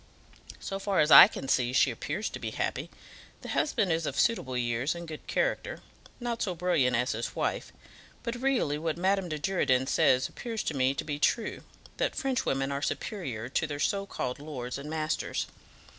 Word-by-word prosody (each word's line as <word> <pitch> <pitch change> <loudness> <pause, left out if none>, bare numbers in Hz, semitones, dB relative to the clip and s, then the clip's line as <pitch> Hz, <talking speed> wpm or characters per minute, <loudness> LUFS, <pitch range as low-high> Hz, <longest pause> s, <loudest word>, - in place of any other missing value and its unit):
"So 195 - -4
far 195 -1 0
as 150 +1 +3
I - - +12
can 135 - -7
see, 125 -1 +2
she 130 0 +4
appears 155 - -3
to - - -6
be - - -3
happy. - - -3 0.5
The - - -8
husband 215 - +1
is 160 -1 0
of - - -2
suitable 135 - +1
years 120 +5 0
and 170 0 -7
good 155 -1 -9
character; - - -1 0.4
not 240 -1 -3
so 185 -3 -1
brilliant 160 -8 +2
as 125 +2 +1
his 115 +2 -4
wife. - - -2 0.5
But 235 - -2
really 250 - +1
what 160 0 -2
Madame 190 0 +1
de 155 - -2
Girardin 145 -6 +1
says 130 -3 +3
appears 230 -3 -5
to - - -2
me 135 0 +1
to - - -3
be 145 -1 -4
true, 220 +8 0 0.4
that - - 0
French 265 -1 -1
women 135 +1 0
are 140 0 -2
superior 130 - -3
to 160 +4 0
their 145 -1 -5
so 200 +5 0
called 125 -6 -4
lords 135 -4 -5
and 145 +2 -7
masters. 155 0 -2
155 Hz, 190 wpm, -29 LUFS, 130-195 Hz, 0.5 s, I